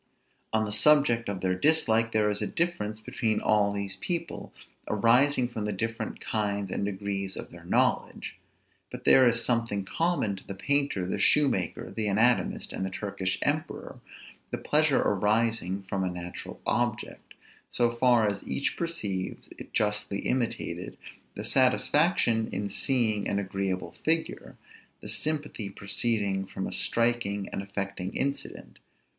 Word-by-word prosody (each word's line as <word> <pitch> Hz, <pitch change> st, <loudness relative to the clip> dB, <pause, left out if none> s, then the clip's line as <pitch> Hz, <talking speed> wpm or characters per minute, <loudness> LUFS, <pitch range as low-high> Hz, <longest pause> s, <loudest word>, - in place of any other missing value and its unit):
On 110 Hz, 0 st, +1 dB
the 105 Hz, -, -5 dB
subject 120 Hz, -3 st, +4 dB
of 95 Hz, -2 st, -4 dB
their 95 Hz, -1 st, +1 dB
dislike 115 Hz, -1 st, +3 dB
there 105 Hz, -1 st, +2 dB
is 105 Hz, -, -1 dB
a -, -, 0 dB
difference 110 Hz, -12 st, -2 dB
between 110 Hz, 0 st, -1 dB
all 105 Hz, -1 st, +3 dB
these 100 Hz, -1 st, -3 dB
people, 170 Hz, -, -4 dB, 0.4 s
arising 125 Hz, +5 st, +3 dB
from 115 Hz, -3 st, -5 dB
the 105 Hz, -, -1 dB
different 115 Hz, +3 st, -4 dB
kinds 100 Hz, -3 st, -2 dB
and -, -, -2 dB
degrees 100 Hz, -1 st, -3 dB
of -, -, -7 dB
their -, -, -13 dB
knowledge; -, -, 0 dB, 0.6 s
but -, -, -8 dB
there 130 Hz, -1 st, +7 dB
is 115 Hz, 0 st, +2 dB
something 115 Hz, -4 st, 0 dB
in -, -, -10 dB
common 165 Hz, -, 0 dB
to -, -, -14 dB
the 100 Hz, -, -5 dB
painter, 140 Hz, -4 st, 0 dB
the 95 Hz, -, -2 dB
shoemaker, 135 Hz, -, +2 dB
the 110 Hz, -1 st, -2 dB
anatomist, 115 Hz, +5 st, +1 dB
and -, -, -3 dB
the 95 Hz, -, -1 dB
Turkish 95 Hz, -1 st, -3 dB
emperor, -, -, -2 dB, 0.5 s
the -, -, -3 dB
pleasure 150 Hz, -2 st, +3 dB
arising 105 Hz, -1 st, +1 dB
from 95 Hz, 0 st, -2 dB
a 90 Hz, -, 0 dB
natural 90 Hz, 0 st, -7 dB
object, 120 Hz, -2 st, -2 dB, 0.3 s
so 120 Hz, -1 st, +2 dB
far 120 Hz, -2 st, +3 dB
as 100 Hz, -, -2 dB
each 140 Hz, -, -1 dB
perceives 105 Hz, -, -3 dB
it -, -, -10 dB
justly 105 Hz, -1 st, 0 dB
imitated; 115 Hz, -8 st, -2 dB, 0.4 s
the 105 Hz, -, -5 dB
satisfaction 130 Hz, -, +2 dB
in 100 Hz, -1 st, -3 dB
seeing 110 Hz, -3 st, +1 dB
an 100 Hz, -, 0 dB
agreeable 95 Hz, -3 st, -2 dB
figure; 160 Hz, +1 st, -1 dB, 0.4 s
the -, -, -9 dB
sympathy 150 Hz, -9 st, -2 dB
proceeding 100 Hz, -1 st, -1 dB
from -, -, -5 dB
a -, -, -4 dB
striking 115 Hz, -4 st, +1 dB
and -, -, -4 dB
affecting 100 Hz, -1 st, -4 dB
incident. 140 Hz, 0 st, -4 dB
110 Hz, 150 wpm, -28 LUFS, 100-120 Hz, 0.6 s, there